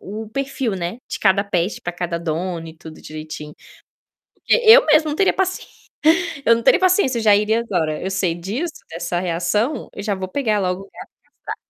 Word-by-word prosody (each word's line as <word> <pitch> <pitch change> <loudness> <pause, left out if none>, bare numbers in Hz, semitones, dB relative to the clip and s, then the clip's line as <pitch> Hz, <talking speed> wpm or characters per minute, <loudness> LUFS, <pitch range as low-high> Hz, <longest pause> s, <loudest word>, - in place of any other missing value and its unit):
o 215 +2 -7
perfil, 265 -4 -2
né, 180 +6 -4
de - - -4
cada 200 0 +3
pet 185 -1 -1
pra 175 - -4
cada 175 -1 -3
dono 165 +1 -3
e 160 - -12
tudo 160 -1 -12
direitinho. 155 -1 -8 0.8
Porque - - -1
eu 450 +3 +9
mesmo 310 0 +4
não 295 - -2
teria 385 +3 +3
paci 375 -1 -1 0.8
eu 230 - +6
não 230 - -4
teria - - +5
paciência, 370 - +2
já 210 -2 +5
iria 215 +2 +2
agora, 165 -9 -2
eu 190 - -3
sei 190 -3 0
disso, 230 - -4 0.2
dessa 175 +1 -3
reação, 185 - -1
eu 200 - -7
já 205 - -1
vou 190 0 -5
pegar 215 -1 0
logo 180 0 -1
o 195 - -17
gato - - -11 0.4
e - - -72
castrar. - - -5
195 Hz, 200 wpm, -20 LUFS, 175-235 Hz, 0.8 s, eu